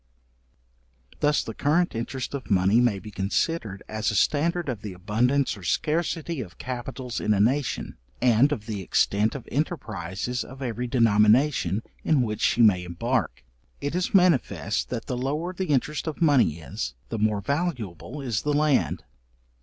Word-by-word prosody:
Thus 150 Hz, 0 st, +2 dB
the 115 Hz, -, -6 dB
current 165 Hz, +8 st, +1 dB
interest 120 Hz, +4 st, -4 dB
of 140 Hz, -2 st, -5 dB
money 100 Hz, +3 st, +4 dB
may 120 Hz, -5 st, +2 dB
be 105 Hz, +2 st, -9 dB
considered 100 Hz, -, -1 dB
as 110 Hz, 0 st, -1 dB
a 110 Hz, -, -2 dB
standard 170 Hz, -, +1 dB
of 120 Hz, -6 st, -3 dB
the 105 Hz, -3 st, -6 dB
abundance 115 Hz, +9 st, +1 dB
or 100 Hz, -, -12 dB
scarcity 160 Hz, -, -1 dB
of 90 Hz, -7 st, -9 dB
capitals 125 Hz, 0 st, -5 dB
in 105 Hz, -, +1 dB
a -, -, 0 dB
nation, 130 Hz, +7 st, 0 dB, 0.2 s
and 125 Hz, +3 st, +4 dB
of 110 Hz, -8 st, -3 dB
the 105 Hz, -3 st, -4 dB
extent 100 Hz, +5 st, +1 dB
of 135 Hz, -, -7 dB
enterprises 120 Hz, -, -2 dB
of 130 Hz, +1 st, -11 dB
every 125 Hz, 0 st, -3 dB
denomination, 115 Hz, -, +3 dB, 0.2 s
in 150 Hz, -5 st, +3 dB
which 105 Hz, -2 st, -3 dB
she 120 Hz, -, +3 dB
may 95 Hz, -5 st, +5 dB
embark: 115 Hz, +7 st, -2 dB, 0.4 s
it 145 Hz, +1 st, -3 dB
is 180 Hz, +1 st, -1 dB
manifest, 180 Hz, -, +2 dB
that 115 Hz, -3 st, -4 dB
the 125 Hz, -, -3 dB
lower 150 Hz, +8 st, -2 dB
the 185 Hz, +1 st, -3 dB
interest 150 Hz, +2 st, 0 dB
of 155 Hz, -, -4 dB
money 140 Hz, -, +4 dB
is, 70 Hz, -5 st, -5 dB
the 115 Hz, -, -3 dB
more 105 Hz, -1 st, +2 dB
valuable 140 Hz, -, -3 dB
is 120 Hz, -6 st, -1 dB
the 150 Hz, -, 0 dB
land. 150 Hz, -1 st, +2 dB
125 Hz, 160 wpm, -26 LUFS, 105-145 Hz, 0.4 s, may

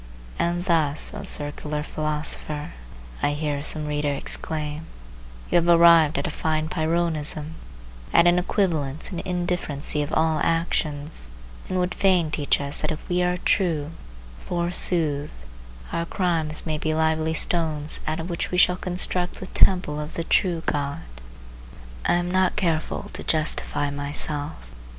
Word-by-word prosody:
And 175 Hz, +1 st, 0 dB
thus, 160 Hz, -5 st, +2 dB
O -, -, -6 dB
circular 150 Hz, 0 st, 0 dB
philosopher, 150 Hz, -1 st, -3 dB, 0.5 s
I 145 Hz, -, +1 dB
hear 145 Hz, -1 st, -2 dB
some 155 Hz, +1 st, 0 dB
reader 150 Hz, -1 st, -1 dB
exclaim, 150 Hz, +2 st, -2 dB, 0.6 s
you -, -, +5 dB
have 170 Hz, 0 st, +2 dB
arrived 170 Hz, -2 st, +6 dB
at -, -, -2 dB
a 170 Hz, -, -2 dB
fine 155 Hz, 0 st, -1 dB
Pyrrhonism, 160 Hz, -2 st, -1 dB, 0.6 s
at 170 Hz, -, +5 dB
an 175 Hz, +1 st, +5 dB
equivalence 160 Hz, -6 st, 0 dB
and 175 Hz, -, -4 dB
indifferency 175 Hz, -5 st, -2 dB
of 145 Hz, +1 st, -4 dB
all 160 Hz, 0 st, +1 dB
actions, 155 Hz, -, 0 dB, 0.4 s
and 185 Hz, -, -1 dB
would 180 Hz, 0 st, 0 dB
fain 180 Hz, -5 st, +2 dB
teach 145 Hz, -1 st, +1 dB
us 140 Hz, 0 st, 0 dB
that -, -, -2 dB
if 155 Hz, -, -7 dB
we 180 Hz, 0 st, 0 dB
are 180 Hz, 0 st, +1 dB
true, 160 Hz, -6 st, +1 dB, 0.5 s
forsooth, 170 Hz, -4 st, +2 dB, 0.5 s
our 170 Hz, 0 st, -2 dB
crimes 165 Hz, -5 st, -1 dB
may 155 Hz, -2 st, -2 dB
be 155 Hz, 0 st, -1 dB
lively 160 Hz, 0 st, +1 dB
stones 155 Hz, -3 st, +1 dB
out 155 Hz, +1 st, -1 dB
of 165 Hz, -, -4 dB
which 170 Hz, -2 st, -3 dB
we 180 Hz, -, -2 dB
shall 180 Hz, 0 st, +5 dB
construct 180 Hz, 0 st, -1 dB
the -, -, -8 dB
temple 180 Hz, -6 st, +3 dB
of 150 Hz, +1 st, -6 dB
the 165 Hz, -, -2 dB
true 170 Hz, -1 st, +1 dB
God! 140 Hz, -1 st, -2 dB, 1.0 s
I -, -, +3 dB
am 175 Hz, 0 st, 0 dB
not 185 Hz, 0 st, +2 dB
careful 165 Hz, -6 st, -1 dB
to -, -, -3 dB
justify 150 Hz, -2 st, -1 dB
myself. 145 Hz, +1 st, -2 dB
160 Hz, 145 wpm, -24 LUFS, 150-175 Hz, 1.0 s, arrived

